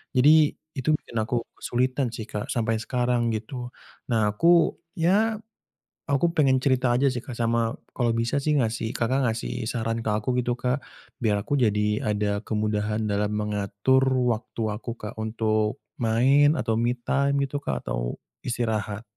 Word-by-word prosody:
Jadi 150 +3 +6 0.2
itu 130 +1 -2
bikin 115 - -7
aku 115 +2 -1
kesulitan 130 +1 0
sih 110 - -5
Kak 105 - -4
sampai 115 -1 0
sekarang 120 0 0
gitu. 120 +3 -5 0.4
Nah 110 -3 +2
aku 170 +9 +4 0.2
ya 205 +7 +2 0.7
aku 140 +4 +3
pengen 135 -4 +4
cerita 130 -2 +2
aja 135 +3 +3
sih 125 - -3
Kak 125 - -7
sama 115 0 +1 0.2
kalau 120 -2 0
bisa 115 +4 0
sih 150 0 +1
ngasih 115 -2 -1
Kakak 130 +3 +1
ngasih 115 +1 -4
saran 115 -1 -2
ke 110 - 0
aku 110 +4 -1
gitu 120 0 0
Kak 125 +3 0 0.4
biar 105 -3 +1
aku 145 - 0
jadi 105 -3 +1
ada 105 -1 0
kemudahan 105 0 -1
dalam 105 +1 0
mengatur 105 +5 +1
waktu 125 -3 0
aku 115 +3 -5
Kak 105 +1 -8
untuk 110 +1 0 0.2
main 135 +6 +4
atau 115 0 0
me 120 +1 +1
time 140 +3 +1
gitu 145 - -2
Kak 65 -2 -2
atau - - -2 0.3
istirahat. 110 -3 -2
115 Hz, 155 wpm, -25 LUFS, 110-130 Hz, 0.7 s, Jadi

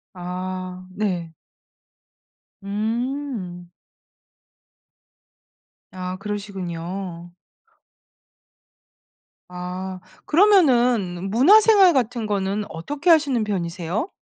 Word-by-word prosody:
아 185 0 -5
네. 180 -5 -3 1.3
음. 220 -3 -3 2.2
아 185 0 -5
그러시군요. 185 -3 -6 2.2
아 180 +1 -6 0.3
그러면은 245 - +3
문화 280 - +7
생활 405 -5 +6
같은 245 -3 0
거는 200 0 -1
어떻게 290 - -3
하시는 285 -8 +4
편이세요? 185 - -3
200 Hz, 135 characters per minute, -22 LUFS, 180-250 Hz, 2.2 s, 문화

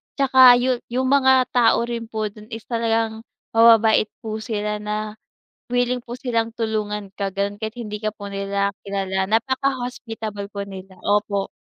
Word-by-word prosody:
Tsaka 260 -2 +7
yun, 250 0 +1
yung 255 +2 -1
mga 265 -2 +5
tao 235 -1 +4
rin 235 -1 -4
po 215 -2 -3
dun 215 +1 -14
is 225 -1 -8
talagang 225 -1 -1 0.3
mababait 225 -1 +5 0.2
po 220 -1 -4
sila, 210 -2 -3
na 210 0 -3 0.6
wiling 245 0 +1
po 240 0 -7
silang 230 -3 -1
tulungan 210 -3 -3
ka, 200 -1 -2
ganun, 200 +1 -3
kahit 220 +1 -5
hindi 210 -3 -5
ka 215 0 -1
po 205 - -8
nila 200 0 -1
kilala. 190 -1 -2
Napaka-hospitable 230 -3 -2
po 200 -1 -5
nila, 190 -1 -10
opo. 205 -1 +1
220 Hz, 155 wpm, -22 LUFS, 205-240 Hz, 0.6 s, Tsaka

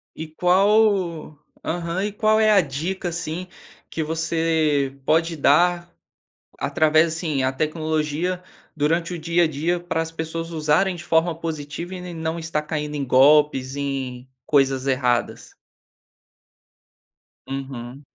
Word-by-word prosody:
E 160 - -6
qual 180 -2 +2 0.3
aham, 170 +2 -2
e 210 - -2
qual 215 +1 +2
é 215 -1 +4
a 200 -3 +6
dica, 175 +6 -3
assim, 170 +1 -4 0.4
que 160 - -3
você 160 -3 0
pode 165 +1 +2
dar, 175 +4 +3 0.7
através 155 +1 +3
assim, 155 -5 -1
a 130 - +1
tecnologia 155 +4 -1 0.3
durante 165 +3 0
o 170 - -5
dia 170 +2 +2
a - - +3
dia 160 +4 -1
pra 175 -2 -2
as 165 0 -4
pessoas 165 +1 -4
usarem 160 +4 +1
de 170 - -9
forma 165 0 +2
positiva 165 +2 -5
e 185 - -6
ne 180 -1 -7
não 160 0 -3
estar 160 -2 -2
caindo 150 -1 -4
em 145 - -2
golpes, 135 0 +4
em 130 -3 -4 0.2
coisas 135 -2 +2
erradas? 125 -2 0 1.9
Uhum. 135 0 -7
160 Hz, 130 wpm, -22 LUFS, 145-175 Hz, 1.9 s, a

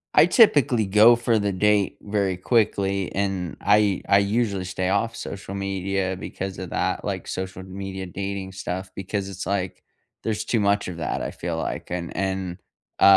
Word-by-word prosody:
I 150 - +8
typically 145 - +5
go 105 +4 +7
for 120 -1 +1
the 100 -1 0
date 100 +1 +2
very 100 -2 0
quickly, 100 -2 +1
and 95 -4 -1
I 105 -2 +3
I 100 - +7
usually 100 -1 0
stay 95 0 -2
off 110 +4 0
social 95 -1 -6
media 95 -1 -2
because 95 0 -5
of 95 -2 -6
that, - - -1
like, - - -3
social 95 0 -4
media 95 0 -6
dating 95 +1 -4
stuff, 95 0 -4
because 95 +1 -3
it's 95 -1 -6
like, 95 -3 -2 0.4
there's 110 -1 -2
too 115 - +1
much 100 0 +2
of 90 -2 -6
that, 85 - -2
I - - -2
feel 85 -1 -4
like, 80 - -4
and 85 -1 -4
and, 95 -2 -2 0.4
uh, - - +2
95 Hz, 175 wpm, -24 LUFS, 95-105 Hz, 0.4 s, I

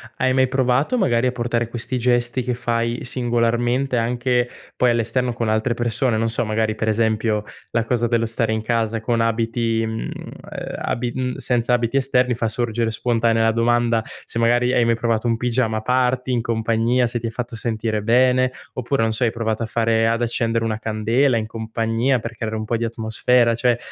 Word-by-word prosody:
hai 130 0 +1
mai 130 0 +3
provato 130 - +1
magari 125 - +2
a 125 - -1
portare 120 -1 -1
questi 120 +2 -3
gesti 120 +1 +1
che 125 +1 -2
fai 120 0 -1
singolarmente 120 +1 0
anche 120 +1 0 0.3
poi 125 -1 +4
all'esterno 120 +2 0
con 115 -1 -2
altre 110 +3 +1
persone? 120 +1 0
Non 115 +1 0
so, 115 - -1
magari, 110 0 0
per 110 0 -3
esempio, 110 -1 +1 0.3
la 115 - +1
cosa 120 0 0
dello 115 0 +1
stare 115 0 -1
in 110 - -1
casa 115 -1 -1
con 115 0 0
abiti, 115 0 0
mhmm, 110 0 -4
ehm, - - -8
abi 120 0 -2
mhmm, 125 -1 -2
senza 120 0 0
abiti 120 +2 +1
esterni 125 -2 +2
fa 115 -1 -1
sorgere 115 0 -1
spontanea 115 0 +1
la 115 - +4
domanda: 115 0 +2 0.2
se 115 - -4
magari 120 +2 +3
hai 120 -2 +3
mai 115 0 +3
provato 115 0 0
un 115 - +2
pigiama 115 -2 0
party 125 +1 +1
in 120 -2 +1
compagnia, 115 +2 +1
se 120 0 -2
ti 115 - -7
ha - - -2
fatto 120 0 -5
sentire 110 -1 -2
bene, 125 +3 +3 0.2
oppure, 125 +1 -1
non 115 0 +2
so, 110 +3 0
hai 115 - +1
provato 115 -1 -2
a - - -1
fare 115 0 +1
ad 115 +1 0
accendere 115 -1 +1
una 110 -1 -2
candela 115 +4 +1
in 110 -1 0
compagnia 115 +3 -1
per 115 +2 -6
creare 110 0 -4
un 110 - -3
po' 115 +2 -1
di 115 - -1
atmosfera, 115 +1 +2
cioè 120 +1 +1
115 Hz, 195 wpm, -21 LUFS, 115-125 Hz, 0.3 s, poi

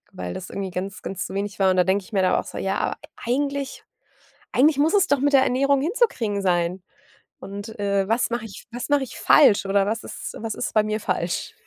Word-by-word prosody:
weil 90 -1 -5
das 180 - -7
irgendwie 195 -1 -4
ganz, 185 +2 -5
ganz 190 - -4
zu - - -7
wenig 200 -1 -3
war 190 -1 +4
und 185 - 0
da 180 - +5
denke 190 +2 +1
ich 225 - -18
mir 195 - +2
dann 185 - +3
auch - - -1
so: - - -8
„Ja, 195 - -1
aber - - -1 0.2
eigentlich 275 +2 -2 0.7
eigentlich 285 +2 +4
muss 310 +4 +3
es 390 - +5
doch 285 - +2
mit 285 +2 +1
der 270 -1 +6
Ernährung 275 +2 +2
hinzukriegen 285 - 0
sein 180 -1 0 0.6
und, 200 +3 -8
äh, 200 -1 +1
was 230 +4 +1
mache 235 -1 -2
ich 200 - -10
was 245 +1 -5
mache 285 -2 +3
ich 255 - -8
falsch 215 -9 +5
oder 195 0 +2
was 225 +2 -2
ist - - -7
was 225 -1 -4
ist - - -4
bei 215 -1 +4
mir 215 +1 -2
falsch?” 170 -3 -2
215 Hz, 230 wpm, -23 LUFS, 195-265 Hz, 0.7 s, der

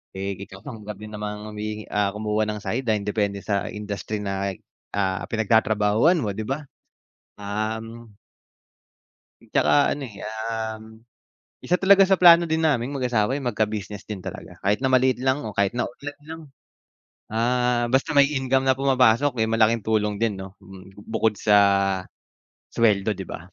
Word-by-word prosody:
Eh, 100 0 -3
ikaw 95 0 -10
lang 110 -7 -9
din 110 0 -9
namang 105 0 -5
humihi 105 0 -6
ah, 105 -1 +1
kumuha 105 0 -1
ng 105 0 -3
sideline, 115 -4 -1
depende 100 -1 -1
sa 100 -2 -1
industry 105 0 -5
na 100 0 -2 0.4
ah, 95 -2 -1
pinagtatrabahuhan 110 - +2
mo, 105 - -1
'di 110 - -4
ba? 135 +3 -2 0.8
Um 110 +3 -5 1.3
At - - -22
saka - - +3 0.2
ano 145 - -5
eh, 100 -3 -10 0.2
um, 110 -1 -4 0.8
isa 180 - +2
talaga 195 0 +6
sa 190 - +3
plano 170 -1 +8
din 160 0 0
naming 140 -4 +1
mag 135 - -4
asawa, 120 0 +1
eh, 140 - -2
magka 110 -4 0
business 105 -1 -6
din 105 -3 -6
talaga. - - -8
Kahit 100 +3 +1
na - - +2
maliit 130 0 +4
lang 130 +3 0
o 110 - -5
kahit 100 +2 +2
na 120 - -1
online 145 +4 -10
lang, 160 0 -7 0.9
ah, 120 +2 +1
basta 135 +2 +1
may 140 - +8
income 135 -1 +1
na 130 - +4
pumapasok, 130 0 +3
eh, - - -1
malaking 115 -1 +2
tulong 105 -2 0
din 105 -3 -1
'no? 95 0 -10
Mm, 95 0 -14
bukod 110 -1 0
sa 105 0 +3 1.1
sweldo, 105 -2 +1
'di 95 - -6
ba? - - -6
110 Hz, 165 wpm, -24 LUFS, 105-130 Hz, 1.3 s, plano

